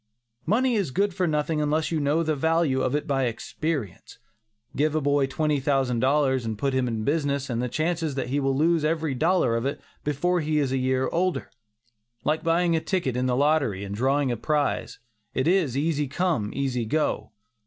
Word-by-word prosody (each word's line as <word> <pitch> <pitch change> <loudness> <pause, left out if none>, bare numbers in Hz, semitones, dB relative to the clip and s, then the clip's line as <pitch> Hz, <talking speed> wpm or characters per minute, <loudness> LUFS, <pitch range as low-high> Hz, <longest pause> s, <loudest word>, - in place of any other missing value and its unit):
Money 245 +7 +2
is 200 -9 0
good 195 +7 0
for 185 -1 0
nothing 150 0 0
unless 150 +2 0
you 160 - 0
know 150 +3 +1
the 155 -1 0
value 160 -2 +1
of 130 +2 0
it 150 - -1
by 135 -4 +1
experience. 120 - -4 0.6
Give 150 +2 +1
a - - +3
boy 145 -1 +2
twenty 150 +1 0
thousand 135 -3 +1
dollars 130 0 +2
and 110 -2 -3
put 135 +5 -1
him 130 -1 +1
in 110 -2 -2
business 140 -1 0
and 120 0 -1
the 125 - -2
chances 160 +2 -1
are - - -9
that 130 -2 -3
he 140 +3 0
will 135 -1 0
lose 165 +1 +2
every 160 -2 0
dollar 155 -3 +2
of 115 +3 -1
it 140 - -3 0.2
before 175 +5 0
he 155 0 0
is 140 -3 +1
a 135 - +1
year 130 0 +1
older. 185 +2 -1 0.7
Like 155 +2 0
buying 170 +1 +2
a 160 - 0
ticket 170 - -1
in 125 +1 0
the 125 - +1
lottery, 140 -9 +1
and 100 0 -5
drawing 135 +4 +1
a 120 - -2
prize, 150 +4 -1 0.4
it 130 - +1
is 170 -8 +2
"easy 150 -1 0
come, 145 - 0
easy 130 -4 -1
go." 150 +7 -1
145 Hz, 205 wpm, -25 LUFS, 130-160 Hz, 0.7 s, a